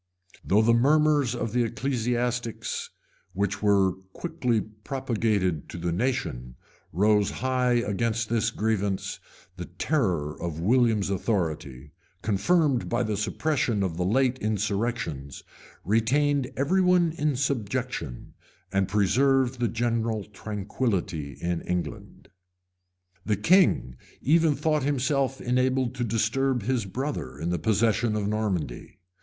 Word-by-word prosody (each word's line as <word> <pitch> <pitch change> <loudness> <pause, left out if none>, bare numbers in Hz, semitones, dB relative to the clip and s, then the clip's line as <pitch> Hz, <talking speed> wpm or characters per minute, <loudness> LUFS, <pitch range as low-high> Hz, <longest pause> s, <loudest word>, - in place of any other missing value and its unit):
Though 105 +3 +3
the 115 +1 +4
murmurs 145 0 +3
of 115 -2 -3
the 125 0 +3
ecclesiastics, 120 -1 -2 0.4
which 100 +1 -1
were 100 -3 +3 0.2
quickly 125 -9 -1
propagated 105 - -2
to - - -7
the 85 0 -2
nation, 85 - -2 0.4
rose 105 +3 +3
high 125 -1 0
against 115 0 0
this 115 0 +1
grievance, 105 -3 -1 0.4
the - - -5
terror 90 - -1
of 85 -2 -4
William's 110 0 +2
authority, 80 - -2 0.3
confirmed 135 - +2
by 120 +1 +1
the 110 -2 -1
suppression 115 0 0
of 85 -4 -2
the 90 - 0
late 130 +6 +2
insurrections, 105 - -2 0.4
retained 130 +6 +2
everyone 180 +3 +3
in 150 -3 -1
subjection, 125 - -3 0.4
and 95 -1 +1
preserved 125 +4 +2
general 115 -2 -1
tranquillity 100 - -3
in 85 -1 -2
England. 90 -5 -5 1.0
{1090.} - - -15
The 105 - +2
king, 160 - +3 0.3
even 160 +1 +4
thought 155 +1 +1
himself 135 0 0
enabled 130 0 +1
to 125 -1 -3
disturb 115 +3 0
his 120 -1 0
brother 100 - -4
in 80 +4 -2
the 90 - -1
possession 110 +4 +1
of 105 -1 -1
Normandy. 100 - -3
115 Hz, 115 wpm, -26 LUFS, 100-130 Hz, 1.0 s, the